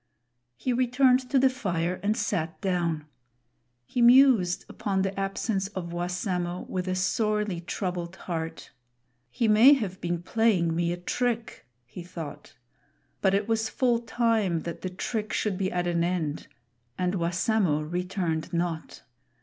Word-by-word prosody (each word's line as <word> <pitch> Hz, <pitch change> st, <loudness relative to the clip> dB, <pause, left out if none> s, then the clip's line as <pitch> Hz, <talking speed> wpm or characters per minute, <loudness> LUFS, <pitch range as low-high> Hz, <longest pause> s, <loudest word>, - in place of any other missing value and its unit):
He 250 Hz, -, -1 dB
returned 255 Hz, +1 st, +3 dB
to 280 Hz, -, +2 dB
the 265 Hz, +1 st, +6 dB
fire 180 Hz, -7 st, -2 dB
and 210 Hz, +2 st, 0 dB
sat 165 Hz, -7 st, -2 dB
down. 170 Hz, -6 st, -1 dB, 0.8 s
He 245 Hz, -, -2 dB
mused 240 Hz, -7 st, +5 dB
upon 195 Hz, -2 st, -1 dB
the 195 Hz, 0 st, -2 dB
absence 195 Hz, 0 st, -1 dB
of 170 Hz, -2 st, -4 dB
Wassamo 180 Hz, 0 st, -2 dB
with 185 Hz, 0 st, -3 dB
a 185 Hz, -, 0 dB
sorely 210 Hz, 0 st, 0 dB
troubled 175 Hz, 0 st, -4 dB
heart. 165 Hz, -3 st, -5 dB, 0.6 s
"He 225 Hz, -, 0 dB
may 220 Hz, +6 st, +8 dB
have 200 Hz, -9 st, -2 dB
been 175 Hz, 0 st, -2 dB
playing 185 Hz, -6 st, +2 dB
me 170 Hz, 0 st, +1 dB
a 175 Hz, -, -2 dB
trick," 235 Hz, +5 st, -2 dB, 0.2 s
he 125 Hz, +9 st, -9 dB
thought; 170 Hz, -3 st, -9 dB, 0.6 s
but 190 Hz, 0 st, +3 dB
it 200 Hz, +1 st, 0 dB
was 225 Hz, -1 st, 0 dB
full 245 Hz, -3 st, +2 dB
time 225 Hz, -7 st, +1 dB
that 170 Hz, +1 st, -6 dB
the 185 Hz, -, -3 dB
trick 215 Hz, +4 st, -3 dB
should 210 Hz, -3 st, 0 dB
be 190 Hz, 0 st, -1 dB
at 175 Hz, 0 st, -1 dB
an 170 Hz, -1 st, +1 dB
end, 170 Hz, -4 st, -2 dB, 0.5 s
and 180 Hz, 0 st, 0 dB
Wassamo 175 Hz, -1 st, +1 dB
returned 175 Hz, -1 st, -2 dB
not. 170 Hz, -2 st, -3 dB
185 Hz, 145 wpm, -27 LUFS, 175-220 Hz, 0.8 s, may